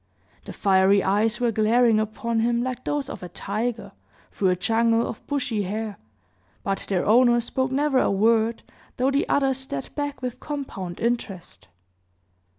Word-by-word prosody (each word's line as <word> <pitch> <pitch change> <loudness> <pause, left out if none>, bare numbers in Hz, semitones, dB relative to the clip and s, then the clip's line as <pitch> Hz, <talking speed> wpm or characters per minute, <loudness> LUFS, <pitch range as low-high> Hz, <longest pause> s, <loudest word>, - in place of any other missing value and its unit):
The - - -7
fiery 195 0 +3
eyes 210 +3 +1
were 240 -1 +1
glaring 225 +1 +3
upon 225 +2 -2
him 235 +1 +1
like 255 0 -4
those 290 -1 -1
of - - -7
a 180 - -7
tiger, 220 +6 -3 0.4
through 190 - +1
a 180 - +2
jungle 230 +4 +2
of 225 - -7
bushy 255 -7 -1
hair, 210 +1 -4 0.6
but 195 0 -2
their 185 -3 0
owner 240 +2 +5
spoke 260 +3 -2
never 275 0 +2
a - - +2
word, 225 +3 +2 0.3
though 260 +2 +2
the 275 - 0
other 270 -1 +2
stared 255 - -6
back 290 -2 -4
with 250 -1 -4
compound 230 -12 -6
interest. 200 - -3
230 Hz, 155 wpm, -24 LUFS, 200-255 Hz, 0.6 s, owner